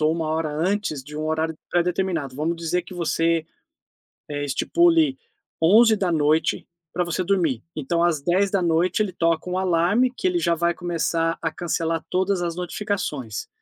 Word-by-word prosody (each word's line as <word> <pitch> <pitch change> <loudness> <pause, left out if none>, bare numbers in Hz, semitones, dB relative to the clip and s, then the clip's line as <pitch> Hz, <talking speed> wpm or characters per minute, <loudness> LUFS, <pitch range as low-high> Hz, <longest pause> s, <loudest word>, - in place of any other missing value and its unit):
ou 155 +1 +3
1 165 -1 -2
hora 160 0 -1
antes 165 -1 -1
de 150 +2 -11
um 155 - -3
horário 160 0 -1
pré-determinado. 175 -5 0
Vamos 165 +3 -1
dizer 170 +2 -1
que 180 +1 -11
você, 165 -1 0 0.9
eh, 145 -1 -3
estipule 320 - +3 0.4
23h 175 -6 +3 0.3
pra 180 - +1
você 175 +1 -2
dormir, 170 - 0
então 170 +3 0
às 170 -4 +1
22h 180 +2 +1
ele 200 - -3
toca 165 0 0
um 180 - -1
alarme 190 +7 +2
que 370 - -1
ele 360 -1 +1
já 170 - +1
vai 170 +1 +1
começar 165 -1 -1
a 160 - -1
cancelar 165 -1 -2
todas 185 0 +1
as 170 -1 -2
notificações. 180 - -3
170 Hz, 155 wpm, -23 LUFS, 160-185 Hz, 0.9 s, ou